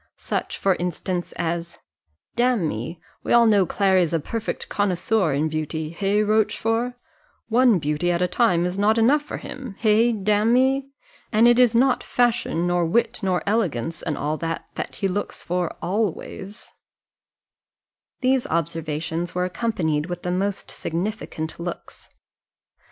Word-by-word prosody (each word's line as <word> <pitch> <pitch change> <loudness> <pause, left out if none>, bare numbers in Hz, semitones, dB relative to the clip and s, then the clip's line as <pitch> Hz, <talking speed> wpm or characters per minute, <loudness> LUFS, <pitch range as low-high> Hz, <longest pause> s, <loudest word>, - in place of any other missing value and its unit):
Such - - -3
for 195 - +2
instance 180 +1 -3
as 170 0 -3 0.6
"Damme, 175 - 0 0.3
we - - 0
all 235 -1 +7
know 205 -5 +4
Clary's 185 -4 +2
a 165 - +2
perfect 225 +9 -4
connoisseur 195 -2 +1
in 145 +3 +1
beauty 155 0 -3
hey, 200 +4 +1
Rochfort? 225 +3 +1 0.5
one 240 -2 +5
beauty 150 +2 -1
at 170 - 0
a 180 - +2
time 180 -3 +2
is 180 +2 -2
not 215 +2 +3
enough 260 +7 +4
for 295 - -6
him 255 -7 -8
hey, 225 +2 +4
damme? 235 +6 +2 0.4
And 225 +2 +5
it 240 +1 +5
is 245 -2 +5
not 255 +2 +3
fashion, 240 -8 +1
nor 175 0 +1
wit, 230 +7 +1
nor 185 -3 0
elegance, 165 - -1
and 155 -4 -3
all 150 +2 -1
that, 165 0 -3
that - - -5
he 195 - -1
looks 200 +2 -4
for 180 -1 -2
always." 200 +1 -3 1.5
These 260 -1 +2
observations 165 +1 -2
were 180 0 +1
accompanied 170 -6 -1
with 175 -1 -5
the 180 - -1
most 195 +2 -2
significant 165 -3 -4
looks. 170 0 -7
190 Hz, 140 wpm, -23 LUFS, 170-225 Hz, 1.5 s, all